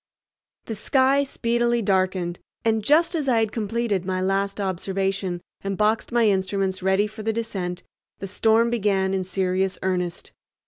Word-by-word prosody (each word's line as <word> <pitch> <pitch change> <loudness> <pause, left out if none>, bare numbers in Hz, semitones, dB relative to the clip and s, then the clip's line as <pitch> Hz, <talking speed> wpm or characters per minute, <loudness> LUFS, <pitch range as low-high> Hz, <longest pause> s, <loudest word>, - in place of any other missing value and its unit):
The 225 - -4
sky 265 +5 +3
speedily 240 -3 0
darkened, 185 -3 0 0.3
and 220 -1 +2
just 310 - +4
as 305 -5 -1
I 240 - +3
had 220 -2 +1
completed 220 -3 -1
my 185 0 -2
last 195 +2 0
observation 190 -1 -2 0.2
and 195 -1 -2
boxed 215 +3 +1
my 235 -2 +3
instruments 190 -1 0
ready 190 +2 +2
for 215 +1 -8
the 220 +1 0
descent, 195 -6 -4 0.3
the - - -6
storm 225 +4 +2
began 195 -4 +1
in 190 -1 0
serious 185 +1 -1
earnest. 180 -2 -2
195 Hz, 150 wpm, -24 LUFS, 190-225 Hz, 0.3 s, just